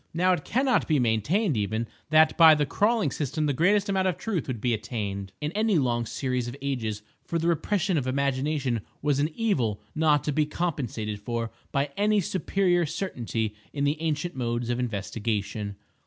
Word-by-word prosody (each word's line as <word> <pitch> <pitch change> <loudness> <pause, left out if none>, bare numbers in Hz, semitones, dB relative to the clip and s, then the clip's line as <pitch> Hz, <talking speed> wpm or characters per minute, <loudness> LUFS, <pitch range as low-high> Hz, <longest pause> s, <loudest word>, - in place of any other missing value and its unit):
Now, 185 +2 +4
it 155 -5 -2
cannot 255 +1 +1
be 155 - +3
maintained, 135 - +1
even, 110 +2 -1 0.2
that 155 0 +5
by 160 -2 +8
the 150 -1 +1
crawling 205 - +1
system 155 +1 -2
the 145 - +1
greatest 200 - +3
amount 190 -1 +1
of 180 - 0
truth 205 -9 -2
would 125 -4 -3
be 120 +2 +1
attained 100 -4 -4
in 150 +1 -2
any 215 0 +2
long 120 -4 +1
series 125 -2 -2
of 120 +3 -6
ages, 115 -6 -3 0.2
for 170 - -2
the 165 +1 0
repression 180 +1 +1
of 130 - -4
imagination 135 -2 0 0.2
was 145 -2 +2
an 150 +2 +2
evil 130 - 0
not 150 -3 +3
to 150 - -1
be 150 +1 +1
compensated 125 -11 -3
for 115 +1 -3 0.2
by 140 0 0
any 210 +1 +3
superior 185 -1 +1
certainty 120 - -3 0.2
in 140 - -1
the 145 +2 0
ancient 160 +1 -1
modes 120 -1 -1
of 120 - -1
investigation. 105 -2 -3
145 Hz, 180 wpm, -27 LUFS, 120-170 Hz, 0.2 s, by